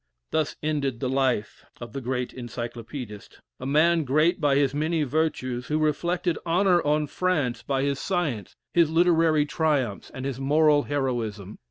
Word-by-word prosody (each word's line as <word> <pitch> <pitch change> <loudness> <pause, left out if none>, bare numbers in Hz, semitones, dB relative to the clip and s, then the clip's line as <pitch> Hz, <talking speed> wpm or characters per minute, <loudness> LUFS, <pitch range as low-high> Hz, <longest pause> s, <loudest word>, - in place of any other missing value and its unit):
Thus 155 -2 0
ended 140 -5 -1
the 130 - -1
life 130 -5 0 0.2
of 120 -2 -8
the 135 - -4
great 125 0 -3
Encyclopædist 120 -2 -7 0.2
a 130 - -5
man 160 +4 +3
great 155 +6 +2
by 145 -2 +3
his 140 -1 +2
many 155 +2 0
virtues 130 -4 -1
who 150 - 0
reflected 170 +3 0
honor 175 +1 +3
on 150 0 +1
France 150 -8 -1
by 135 -1 -1
his 140 -1 0
science, 150 - -2 0.2
his 170 -3 +4
literary 165 -2 +3
triumphs, 145 -9 -1
and 130 - -6
his 135 -2 -3
moral 150 +2 +4
heroism. 120 -9 -3
145 Hz, 155 wpm, -25 LUFS, 125-160 Hz, 0.2 s, his